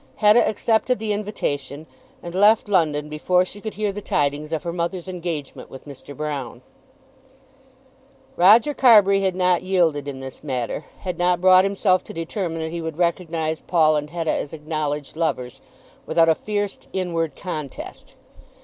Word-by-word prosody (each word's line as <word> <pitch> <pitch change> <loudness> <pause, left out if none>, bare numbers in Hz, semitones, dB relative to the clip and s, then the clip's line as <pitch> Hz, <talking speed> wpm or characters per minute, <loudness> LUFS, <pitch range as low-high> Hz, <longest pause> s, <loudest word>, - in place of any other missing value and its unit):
Hetta 215 +2 +5
accepted 225 +4 +1
the 215 0 -2
invitation 150 -8 -4 0.4
and 170 - -7
left 210 +4 +4
London 155 -7 +1
before 180 +4 +1
she 205 +2 -11
could 220 0 -6
hear 210 -1 -1
the 205 +1 -7
tidings 145 -2 -1
of 160 +1 -2
her 170 -1 -4
mother's 170 +1 -3
engagement 170 -6 -6
with 135 - -12
Mr. 145 0 -11
Broune. 140 -5 -5 1.7
Roger 220 +11 +6
Carbury 205 -7 +5
had 190 -2 0
not 180 -1 +2
yielded 170 -7 +1
in 135 -2 -6
this 135 +1 -9
matter, 130 +1 -3 0.2
had 180 -2 -5
not 180 0 +2
brought 185 0 +6
himself 195 -1 +1
to - - -9
determine 165 0 -4
that 160 0 -4
he 170 0 -4
would 160 -1 -5
recognise 165 -2 -1
Paul 155 -3 +3
and 150 0 -2
Hetta 165 -1 -2
as 145 - -4
acknowledged 150 -2 -4
lovers, 140 -7 -2 0.5
without 165 -1 +3
a - - +6
fierce 205 +3 -3
inward 165 -5 -2
contest. 155 -6 -7
170 Hz, 160 wpm, -22 LUFS, 150-190 Hz, 1.7 s, Roger